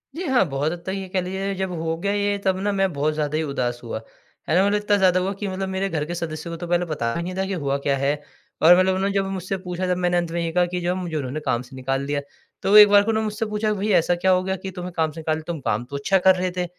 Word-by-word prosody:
जी 350 Hz, -, -4 dB
हाँ, 260 Hz, -6 st, +4 dB
बहुत 140 Hz, +3 st, -1 dB
हद 175 Hz, -, -5 dB
तक -, -, -4 dB
ये 195 Hz, -1 st, -5 dB
कह 185 Hz, 0 st, 0 dB
लीजिए, 190 Hz, +2 st, -3 dB
जब 190 Hz, 0 st, -2 dB
हो 165 Hz, 0 st, -1 dB
गया 200 Hz, +4 st, -1 dB
ये 205 Hz, 0 st, 0 dB
तब 190 Hz, -1 st, +2 dB
ना 205 Hz, +1 st, 0 dB
मैं 195 Hz, -2 st, +1 dB
बहुत 150 Hz, +2 st, 0 dB
ज़्यादा 150 Hz, 0 st, -1 dB
ही 160 Hz, -, 0 dB
उदास 125 Hz, -4 st, -2 dB
हुआ। 115 Hz, -1 st, -5 dB, 0.5 s
है -, -, +3 dB
ना? 190 Hz, +2 st, +5 dB
मतलब 205 Hz, -, +2 dB
इतना 205 Hz, 0 st, +2 dB
ज़्यादा 185 Hz, -2 st, +4 dB
हुआ 190 Hz, +2 st, -1 dB
कि 200 Hz, +1 st, -5 dB
मतलब 190 Hz, 0 st, -3 dB
मेरे 190 Hz, +1 st, -1 dB
घर 150 Hz, -3 st, -2 dB
के 175 Hz, +2 st, -5 dB
सदस्यों 170 Hz, 0 st, -5 dB
को -, -, -5 dB
तो 175 Hz, +1 st, -6 dB
पहले 175 Hz, 0 st, +1 dB
बताया 145 Hz, -3 st, -2 dB
नहीं 180 Hz, +2 st, -5 dB
था 190 Hz, 0 st, -1 dB
कि 195 Hz, -, -3 dB
हुआ 140 Hz, -5 st, -1 dB
क्या 140 Hz, -, +3 dB
है 140 Hz, +1 st, +1 dB, 0.5 s
और 175 Hz, +3 st, +8 dB
मतलब 185 Hz, 0 st, +3 dB
उन्होंने 195 Hz, +1 st, 0 dB
जब 195 Hz, -1 st, +1 dB
मुझसे 190 Hz, +1 st, -3 dB
पूछा 180 Hz, 0 st, -4 dB
तब -, -, -3 dB
मैंने 175 Hz, -1 st, +1 dB
अंत 170 Hz, -1 st, -1 dB
में 170 Hz, 0 st, -1 dB
ये 165 Hz, -, -2 dB
कहा 180 Hz, +1 st, +3 dB
कि 180 Hz, -, -1 dB
जो 175 Hz, -, -1 dB
है -, -, -4 dB
मुझे 170 Hz, -3 st, -4 dB
उन्होंने 140 Hz, +2 st, -3 dB
काम 125 Hz, -3 st, +1 dB
से 130 Hz, +1 st, -13 dB
निकाल 135 Hz, +1 st, -2 dB
दिया। 145 Hz, 0 st, -1 dB, 0.4 s
तो 200 Hz, -, +3 dB
एक 210 Hz, -1 st, +10 dB
बार 205 Hz, 0 st, +6 dB
को 225 Hz, -, -3 dB
उन्होंने 220 Hz, 0 st, 0 dB
मुझसे 215 Hz, +1 st, -2 dB
पूछा 215 Hz, 0 st, -1 dB
कि, 210 Hz, -, -1 dB
"भई, 210 Hz, +2 st, -1 dB
ऐसा 175 Hz, -1 st, +3 dB
क्या 185 Hz, +2 st, +2 dB
हो 185 Hz, 0 st, +3 dB
गया 190 Hz, 0 st, -1 dB
कि 190 Hz, 0 st, -7 dB
तुम्हें 180 Hz, -1 st, -6 dB
काम 160 Hz, -1 st, +1 dB
से 160 Hz, -, -9 dB
निकाल 155 Hz, 0 st, -1 dB
तुम 170 Hz, -2 st, -3 dB
काम 110 Hz, +4 st, -1 dB
तो 140 Hz, -, -6 dB
अच्छा 190 Hz, +7 st, +2 dB
कर 190 Hz, -, +8 dB
रहे 185 Hz, 0 st, -1 dB
थे।" 180 Hz, -, 0 dB
180 Hz, 315 wpm, -23 LUFS, 155-195 Hz, 0.5 s, एक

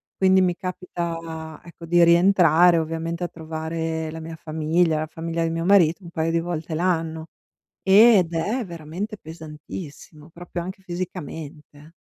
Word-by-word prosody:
Quindi 190 Hz, 0 st, +4 dB
mi 180 Hz, -1 st, +2 dB
capita 165 Hz, -3 st, -5 dB
ecco 170 Hz, -1 st, -12 dB
di 175 Hz, 0 st, +5 dB
rientrare 170 Hz, -1 st, +5 dB
ovviamente 165 Hz, +2 st, -3 dB
a -, -, 0 dB
trovare 160 Hz, 0 st, -4 dB
la 160 Hz, -, -7 dB
mia 160 Hz, 0 st, -7 dB
famiglia, 160 Hz, 0 st, 0 dB
la 155 Hz, -, -3 dB
famiglia 165 Hz, +1 st, -4 dB
di 165 Hz, -, +1 dB
mio 165 Hz, +1 st, -2 dB
marito, 185 Hz, -2 st, +4 dB
un 170 Hz, -, -10 dB
paio 160 Hz, 0 st, -1 dB
di 165 Hz, 0 st, +1 dB
volte 165 Hz, -1 st, -4 dB
l'anno, 165 Hz, -2 st, -1 dB, 0.5 s
ed 195 Hz, -3 st, +6 dB
è 210 Hz, +9 st, -1 dB
veramente 175 Hz, +5 st, -6 dB
pesantissimo, 155 Hz, -1 st, -10 dB
proprio 175 Hz, 0 st, -6 dB
anche 190 Hz, +3 st, -7 dB
fisicamente. 160 Hz, -4 st, -7 dB
165 Hz, 145 wpm, -23 LUFS, 160-175 Hz, 0.5 s, ed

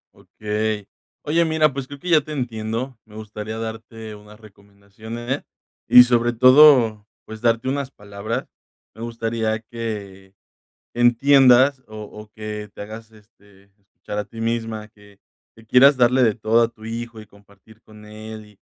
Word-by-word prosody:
Okey. 105 Hz, -1 st, -4 dB, 0.4 s
Oye, 165 Hz, +3 st, +1 dB
mira, 160 Hz, -2 st, +2 dB
pues 135 Hz, -1 st, -6 dB
creo 145 Hz, -, -10 dB
que 180 Hz, -, -7 dB
ya 165 Hz, -2 st, +6 dB
te 155 Hz, +2 st, -9 dB
entiendo. 115 Hz, -1 st, -4 dB
Me 105 Hz, -, -17 dB
gustaría 110 Hz, 0 st, -7 dB
darte 110 Hz, 0 st, -7 dB
unas 105 Hz, +1 st, -16 dB
recomendaciones 110 Hz, +5 st, -8 dB, 0.4 s
y 125 Hz, -, +9 dB
sobre 120 Hz, -1 st, +1 dB
todo, 130 Hz, -4 st, +6 dB, 0.2 s
pues 110 Hz, 0 st, -10 dB
darte 115 Hz, +2 st, +1 dB
unas 140 Hz, 0 st, -3 dB
palabras. 105 Hz, +4 st, -6 dB, 0.4 s
Me 110 Hz, -, -13 dB
gustaría 115 Hz, -1 st, -2 dB
que 105 Hz, -5 st, -7 dB, 0.6 s
entiendas 130 Hz, +2 st, +4 dB
o 110 Hz, -, -12 dB
o 105 Hz, 0 st, -12 dB
que 105 Hz, -1 st, -7 dB
te -, -, -9 dB
hagas 110 Hz, +2 st, -10 dB
este 100 Hz, -2 st, -23 dB, 0.2 s
escuchar 100 Hz, +1 st, -8 dB
a 105 Hz, -, -4 dB
ti 115 Hz, -, -12 dB
misma 115 Hz, -2 st, -3 dB
que 105 Hz, -2 st, -21 dB, 0.4 s
que 115 Hz, -, -18 dB
quieras 130 Hz, +5 st, +5 dB
darle 125 Hz, +1 st, +3 dB
de 110 Hz, -3 st, +2 dB
todo 115 Hz, +1 st, +2 dB
a 115 Hz, -, +3 dB
tu 115 Hz, -2 st, -15 dB
hijo 115 Hz, 0 st, -6 dB
y 110 Hz, -, -11 dB
compartir 100 Hz, +2 st, -22 dB
con 105 Hz, 0 st, -16 dB
él 110 Hz, 0 st, -10 dB
y 105 Hz, -2 st, -22 dB
110 Hz, 155 wpm, -21 LUFS, 105-120 Hz, 0.6 s, y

